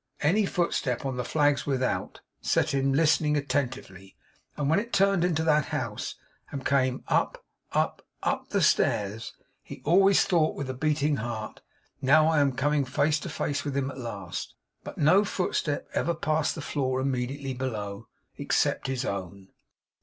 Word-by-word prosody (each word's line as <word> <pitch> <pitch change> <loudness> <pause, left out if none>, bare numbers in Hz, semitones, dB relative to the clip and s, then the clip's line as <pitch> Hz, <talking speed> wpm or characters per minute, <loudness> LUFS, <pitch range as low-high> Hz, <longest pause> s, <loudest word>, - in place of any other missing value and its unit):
Any 195 +7 +3
footstep 145 -10 -1
on 130 -2 -2
the 125 - -1
flags 145 +2 +1
without 130 -2 -1 0.2
set - - +1
him 135 0 +2
listening 150 +1 +3
attentively 130 -10 -3 0.4
and 145 - -1
when 160 +6 +3
it 235 +3 -6
turned 195 -2 +3
into 165 -3 +1
that 150 -3 +3
house, - - -4 0.3
and 135 -2 -6
came 130 -2 +1
up, - - 0 0.3
up, - - 0 0.2
up - - -1
the - - +1
stairs, 105 +2 +1 0.3
he - - -10
always 195 +5 +5
thought 165 -4 +2
with 135 -2 -4
a - - -5
beating 150 +1 +1
heart, 110 -2 -5 0.4
'Now 155 +4 +5
I 160 -1 +3
am 140 -2 +3
coming 145 +2 +1
face 150 +4 +1
to - - -6
face 145 - -2
with 145 -2 -3
him 135 0 -1
at - - -11
last!' 100 -7 -6 0.3
But - - -8
no 175 +7 +5
footstep 180 -7 -1
ever 170 +1 0
passed 155 -1 0
the 160 - -5
floor 130 -3 -1
immediately 135 +1 -2
below: 110 -6 -4 0.3
except - - +1
his 130 -2 -2
own. 95 0 -5
140 Hz, 160 wpm, -27 LUFS, 130-155 Hz, 0.4 s, always